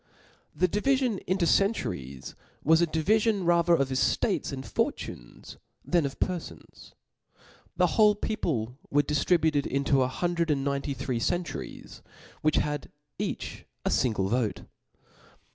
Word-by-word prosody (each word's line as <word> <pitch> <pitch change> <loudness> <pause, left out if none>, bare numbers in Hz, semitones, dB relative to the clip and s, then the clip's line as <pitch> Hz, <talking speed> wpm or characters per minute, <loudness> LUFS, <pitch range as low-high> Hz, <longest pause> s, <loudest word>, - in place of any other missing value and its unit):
The 180 - +3
divifion 245 +2 +1
into 185 -1 +1
centuries 90 - 0 0.3
was 160 +3 +5
a 170 - +3
divifion 205 +5 +1
rather 170 0 +4
of 140 -4 0
eftates 140 - 0
and 135 -1 -6
fortunes, - - -4 0.3
than 170 -5 +2
of 135 - -9
pcrfons. 180 -3 -5 0.8
The 180 - +5
whole 210 +4 +4
people 135 - -2
were 145 +1 +3
diftributed 150 0 +2
into 140 0 +2
a 130 - +3
hundred 170 +4 -1
and 145 -2 +1
C) - - -4
See - - -4
Li 140 - +2
ninety 140 0 -2
three 130 -2 -2
centuries 175 +8 -4 0.2
(*), - - -22
which 155 0 +2
had 150 -1 -1 0.3
each - - -4 0.2
a - - +2
fingte 120 -4 +1
x?andDio - - -2
vote. 120 -3 0
160 Hz, 145 wpm, -28 LUFS, 135-180 Hz, 0.8 s, was